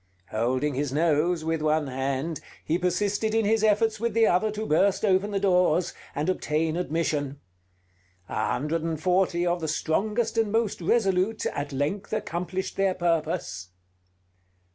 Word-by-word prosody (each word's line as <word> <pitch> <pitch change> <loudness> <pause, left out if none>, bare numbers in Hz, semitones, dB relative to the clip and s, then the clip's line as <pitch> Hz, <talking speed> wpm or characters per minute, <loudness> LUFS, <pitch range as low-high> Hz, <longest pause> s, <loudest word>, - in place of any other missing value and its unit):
Holding 130 +6 0
his 140 +1 -2
nose 160 +2 +1
with 160 -1 -1
one 155 0 +2
hand, 135 +4 -2 0.2
he 165 +3 0
persisted 205 +4 0
in 225 -1 +2
his 220 +1 +2
efforts 220 +1 +2
with 230 -1 -1
the 225 -1 +5
other 185 +2 +2
to 215 +1 -4
burst 195 +5 +2
open 195 +1 +2
the 200 -1 -1
doors, 180 -3 +2 0.2
and 145 +2 -1
obtain 160 -3 0
admission. 155 -5 -1 0.9
A - - -1
hundred 150 +6 -1
and 160 -1 -2
forty 180 0 +1
of 175 0 0
the 160 - -2
strongest 210 +9 0
and 220 -2 +1
most 225 -4 0
resolute 195 +2 +1
at 145 0 -3
length 145 +11 -2
accomplished 180 -2 -3
their 195 -1 +2
purpose.... 165 - -1
175 Hz, 150 wpm, -26 LUFS, 155-205 Hz, 0.9 s, the